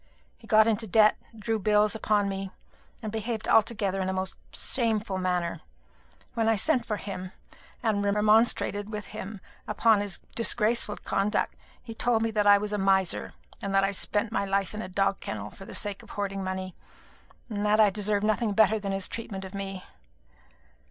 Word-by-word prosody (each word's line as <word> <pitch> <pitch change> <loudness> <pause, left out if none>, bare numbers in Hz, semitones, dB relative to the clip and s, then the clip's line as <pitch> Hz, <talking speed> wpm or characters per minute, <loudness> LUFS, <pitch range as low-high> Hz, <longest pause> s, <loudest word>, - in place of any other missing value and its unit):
He - - -18
got 215 0 +6
into 225 0 0
debt, 215 +2 +5 0.2
drew 220 +1 -1
bills 210 +1 +3
upon 210 -2 +1
me, 195 0 -3 0.5
and 215 - -3
behaved 220 0 -3
altogether 205 -4 +2
in 190 - -1
a - - -1
most 190 0 -3 0.2
shameful 220 -6 -1
manner. 175 -3 -1 0.7
When 225 -1 +1
I 225 - +4
sent 250 +2 +1
for 210 - -1
him, 185 -2 -6 0.5
and 210 -3 +1
remonstrated 210 0 +2
with 210 -1 -5
him 200 0 -7 0.3
upon 220 -3 +3
his 205 -2 -2 0.2
disgraceful 230 -2 +1
conduct, 200 +2 -1 0.3
he 230 - -7
told 225 0 +1
me 225 - 0
that 210 -1 +1
I 205 0 +8
was 210 +1 -3
a 210 - 0
miser, 190 -2 +1 0.3
that 195 0 +1
I 195 - +2
spent 205 +2 0
my 225 - 0
life 195 0 -1
in 210 - -4
a 185 - -6
dog 195 +1 +1
kennel 105 -1 -6
for 195 - -12
the - - -7
sake 205 -2 -2
of - - -16
hoarding 195 -1 -3
money, 185 -1 -4 0.7
and 210 -3 -3
that 210 +1 +3
I 210 -2 +6
deserved 205 +1 0
nothing 215 0 +1
better 220 +1 +4
than 200 -1 -3
his 195 -1 -1
treatment 195 -4 -6
of 190 - -10
me. 195 -1 -5
205 Hz, 180 wpm, -27 LUFS, 195-220 Hz, 0.7 s, I